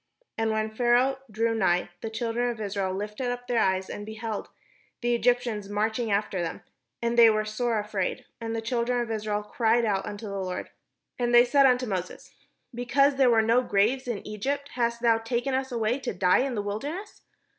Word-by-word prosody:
And 225 0 0
when 220 0 -1
Pharaoh 245 +3 +3
drew 225 +2 0
nigh, 180 -5 +1
the 225 - -4
children 235 +2 -1
of 235 -2 -5
Israel 200 -2 -2
lifted 210 +6 -4
up 245 0 -4
their 240 -2 +1
eyes, 190 0 +1
and, 205 - -6
behold, 220 0 -5 0.5
the 240 0 +1
Egyptians 235 -3 +1
marched 215 +3 0
after 205 -4 0
them; 165 - -4 0.4
and 235 0 +1
they 230 -1 +9
were 215 0 +1
sore 225 +2 -1
afraid; 205 -3 -2
and 225 -1 -4
the 225 - -3
children 245 +1 0
of 235 -1 -2
Israel 210 -1 -2
cried 230 +2 +1
out 200 -1 0
unto 205 +1 -6
the 200 -1 -4
Lord. 185 -1 -4 0.5
And 240 0 +2
they 240 +1 +8
said 275 +2 +5
unto 250 0 +2
Moses: 185 -5 -5 0.4
''Because 275 +3 +2
there 265 -2 +5
were 225 -2 +4
no 230 +3 +4
graves 245 +4 +1
in 230 -5 -4
Egypt, 280 +7 -3
hast 235 -1 -1
thou 230 -1 +4
taken 240 +3 -2
us 265 0 -1
away 235 +2 0
to 265 - -4
die 180 0 +4
in 260 -1 -1
the 205 - -2
wilderness? 290 - -5
225 Hz, 195 wpm, -27 LUFS, 210-245 Hz, 0.5 s, they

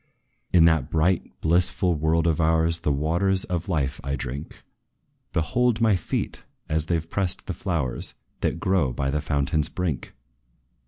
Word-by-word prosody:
"In 85 -2 +6
that 80 -5 +3
bright, 85 +3 +1
blissful 90 +2 +2
world 80 +1 +1
of 85 0 +2
ours, 80 +1 +2
The 75 - 0
waters 85 +7 +1
of 90 +1 -3
life 70 -6 -1
I 70 +1 -1
drink: 70 +3 -6 0.7
Behold 115 +8 +1
my 110 -3 +4
feet, 90 - -3 0.2
as 80 0 +1
they 85 - +2
've 80 0 -6
pressed 95 0 -1
the - - -3
flowers, 80 -10 -3 0.2
That 85 - -1
grow 95 -9 +1
by 70 +2 -1
the 75 +1 0
fountain's 75 0 +1
brink! 90 -7 -3
80 Hz, 155 wpm, -25 LUFS, 75-90 Hz, 0.7 s, In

